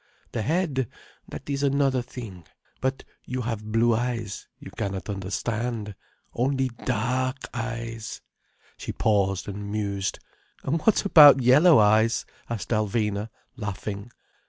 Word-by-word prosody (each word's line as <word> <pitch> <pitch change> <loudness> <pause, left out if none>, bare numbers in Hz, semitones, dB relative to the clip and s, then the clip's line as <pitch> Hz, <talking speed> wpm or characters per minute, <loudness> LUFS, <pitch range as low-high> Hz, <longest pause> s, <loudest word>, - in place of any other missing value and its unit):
The 115 - -2
head—that 145 - -3
is 140 -1 -2
another 140 -2 +2
thing. 110 -10 -9 0.3
But 130 +1 -1 0.2
you 125 +1 -4
have 110 -3 -4
blue 115 +1 +3
eyes, 115 -3 -3
you - - -11
cannot 100 +1 -4
understand. 105 +3 -3 0.4
Only 130 +1 +1 0.2
dark 130 +3 0 0.2
eyes—" 115 -2 -5 0.6
She - - -5
paused 95 -3 +1
and 100 0 -5
mused. 100 -2 -2 0.5
"And 160 +5 0
what 220 +2 +3
about 145 -8 +9
yellow 150 +6 +7
eyes?" 110 +2 +4 0.2
asked 115 -3 -4
Alvina, 105 -1 0 0.3
laughing. 105 +1 -5
115 Hz, 115 wpm, -26 LUFS, 105-130 Hz, 0.6 s, about